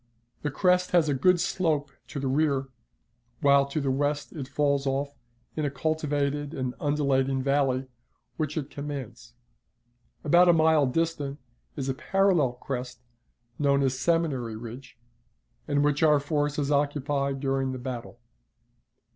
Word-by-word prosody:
The 145 - -1
crest 180 +4 +2
has 170 -3 +4
a - - +2
good 175 +7 +3
slope 155 -6 0 0.2
to 145 - -5
the 135 - -2
rear, 135 -1 +1 0.7
while 140 -1 +5
to 140 +2 -2
the 140 -2 0
west 145 +2 -1
it 140 -5 -6
falls 140 0 0
off 140 +1 -1 0.4
in 155 - -2
a 145 - +1
cultivated 145 0 -1
and 130 -1 -2
undulating 135 -2 +1
valley, 135 -2 +1 0.5
which 155 0 -3
it 145 -2 -4
commands. 140 -4 -7 0.9
About 175 +4 +5
a - - +7
mile 160 -3 +4
distant 145 -1 -1 0.4
is 135 -3 -3
a 135 - 0
parallel 180 -5 +2
crest, 125 -1 -6 0.6
known 140 -1 +3
as 130 -1 0
Seminary 135 -6 0
Ridge, 120 +3 -9 0.7
and 145 -1 +2
which 145 -1 +1
our 150 -2 +5
forces 145 -1 -1
occupied 140 -1 0
during 135 -1 0
the 130 - -4
battle. 125 -1 -6
140 Hz, 140 wpm, -27 LUFS, 135-150 Hz, 0.9 s, a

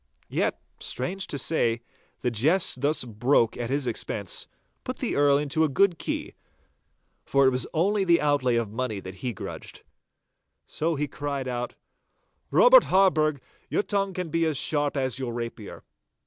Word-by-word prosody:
Yet, - - 0 0.2
strange 185 +10 -2
to 140 - -3
say, 120 -5 +1 0.4
the 125 - 0
jest 140 - +3
thus 145 +1 +1
broken 120 +1 +1
at 120 - -4
his 140 0 0
expense, 105 -5 -2 0.4
put - - -5
the - - -2
Earl 145 -1 +4
into 150 +2 0
a 155 - +2
good 175 +4 +2
key, - - -4 0.9
for 140 0 +3
it 130 - +5
was 125 0 +1
only 195 +5 +1
the 170 -2 +4
outlay 145 -4 +1
of 115 -3 -1
money 115 -2 -3
that 95 0 -9
he 125 - -2
grudged. 100 - -8 0.8
So 160 +1 -1
he 150 +1 -2
cried 140 -1 -4
out, 125 -1 -4 0.7
'Robert - - +7
Harburgh, 155 -8 +2 0.3
your - - +1
tongue 195 -2 -1
can 180 -2 -3
be 165 0 +1
as 155 -3 0
sharp 145 0 0
as 130 -2 -1
your 120 -3 -4
rapier. 115 -3 -7
140 Hz, 160 wpm, -26 LUFS, 120-160 Hz, 0.9 s, Robert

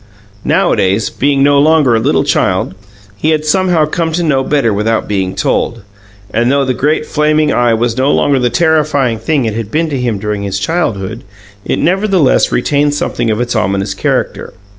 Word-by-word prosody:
Nowadays, 95 +4 +1
being 140 0 +1
no 140 0 +4
longer 150 -4 +3
a - - +2
little - - +1
child, - - 0 0.4
he 155 +10 -1
had 155 -1 0
somehow 175 -1 +2
come 160 +2 -2
to 175 +1 -1
know 140 -5 +1
better 130 -6 +1
without 110 +2 -1
being 95 -2 -2
told, 115 -3 -1 0.5
and, 120 +3 +1
though 140 0 +1
the 130 - 0
great 150 +4 0
flaming 150 0 +1
Eye 120 -2 +2
was 115 0 -1
no 130 +2 +2
longer 140 -2 +2
the 125 -1 +1
terrifying 150 -7 +1
thing 135 +2 0
it 110 - -2
had 110 -1 -5
been 160 +4 -1
to 135 -3 -2
him 120 -4 -1
during 105 0 -3
his 100 -1 -3
childhood, 110 - -2 0.4
it - - -2
nevertheless 190 -5 +2
retained 145 +3 +1
something 120 -4 -2
of 110 0 -1
its 120 0 -2
ominous 100 -1 -1
character. 95 - -2
130 Hz, 185 wpm, -13 LUFS, 110-155 Hz, 0.5 s, no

